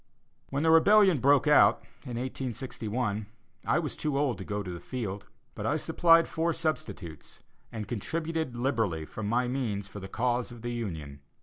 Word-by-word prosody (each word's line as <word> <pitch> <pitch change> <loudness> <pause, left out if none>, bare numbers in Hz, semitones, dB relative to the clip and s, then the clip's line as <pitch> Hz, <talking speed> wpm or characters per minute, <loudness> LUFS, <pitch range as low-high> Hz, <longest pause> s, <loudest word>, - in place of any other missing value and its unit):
When 140 +2 -1
the 160 - +4
rebellion 190 0 +6
broke 140 +2 +4
out 150 0 +5 0.2
in 125 -3 -5
1861, 120 -4 -3 0.4
I - - +2
was 165 -4 -2
too 150 -3 -1
old 140 -8 0
to - - -5
go 105 +1 -3
to 90 - -6
the 85 - -6
field, 105 -5 -5 0.3
but - - -4
I - - +1
supplied 165 -1 +4
four 165 +1 0
substitutes, 105 - -4 0.3
and 110 -3 -5
contributed 160 +4 -3
liberally 115 - 0
from 105 +6 -6
my 120 +3 +1
means 115 -6 -2
for 105 - -9
the 95 - -7
cause 120 +2 -1
of 120 -1 -11
the 120 0 -3
Union. 80 -12 -5
120 Hz, 175 wpm, -29 LUFS, 105-145 Hz, 0.4 s, rebellion